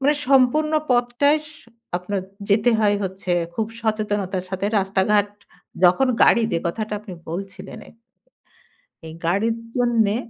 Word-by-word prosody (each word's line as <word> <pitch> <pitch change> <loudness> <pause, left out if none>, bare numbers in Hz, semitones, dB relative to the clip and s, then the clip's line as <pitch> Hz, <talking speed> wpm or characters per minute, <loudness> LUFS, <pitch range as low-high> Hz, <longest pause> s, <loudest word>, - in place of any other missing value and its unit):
মানে 290 +2 +3
সম্পূর্ণ 280 +4 +3 0.2
পথটায় 245 +5 +3
সু 300 - -18 0.3
আপনার 190 +2 -3 0.3
যেতে 215 +4 +3
হয় 205 -1 +3
হচ্ছে 190 -1 -3 0.2
খুব 220 -1 -1
সচেতনতার 205 -4 -2
সাথে 195 +1 -2
রাস্তা-ঘাট 200 +2 +1 0.6
যখন 185 +10 +5 0.2
গাড়ি 235 - +4
যে, 165 - +2
কথাটা 215 +5 -3
আপনি 210 -3 -10 0.2
বলছিলেন 195 +3 -7
এই, - - -16 1.2
এই 160 - -9
গাড়ির 220 +6 +1 0.2
জন্যে 230 -4 +2
210 Hz, 130 wpm, -22 LUFS, 190-240 Hz, 1.2 s, যখন